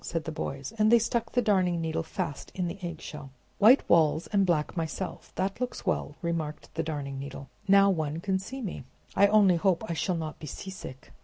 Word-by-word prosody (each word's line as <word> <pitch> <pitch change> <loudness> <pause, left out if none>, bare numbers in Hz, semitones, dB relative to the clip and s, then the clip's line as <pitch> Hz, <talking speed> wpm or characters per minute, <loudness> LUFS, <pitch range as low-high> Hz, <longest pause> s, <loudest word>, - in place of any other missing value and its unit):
said 165 -2 -2
the 160 - -4
boys; 140 +2 -5
and 215 +1 +5
they 235 - +8
stuck 230 0 -1
the 245 - +2
Darning 185 -5 +2
Needle 165 0 -1
fast 165 -2 -5
in 180 -2 -1
the 175 +4 -6
eggshell. 155 -4 -7 0.3
"White 235 +7 +6
walls, 160 -1 +4
and 200 -2 +3
black 155 -4 +1
myself! 165 +3 -4
that 195 +5 -2
looks 250 -3 -3
well," 165 -6 -1
remarked 165 -3 -3
the 165 - -1
Darning 145 -4 -4
Needle. 135 0 -7 0.2
"Now 200 0 +6
one 155 -3 -2
can 190 +1 0
see 260 +7 -7
me. 195 - -5 0.3
I 200 - +6
only 200 -4 +5
hope 185 +2 +2
I - - -2
shall 175 +2 0
not 155 -1 -5
be 155 - -8
seasick!" 150 -4 -8
170 Hz, 205 wpm, -28 LUFS, 155-200 Hz, 0.3 s, they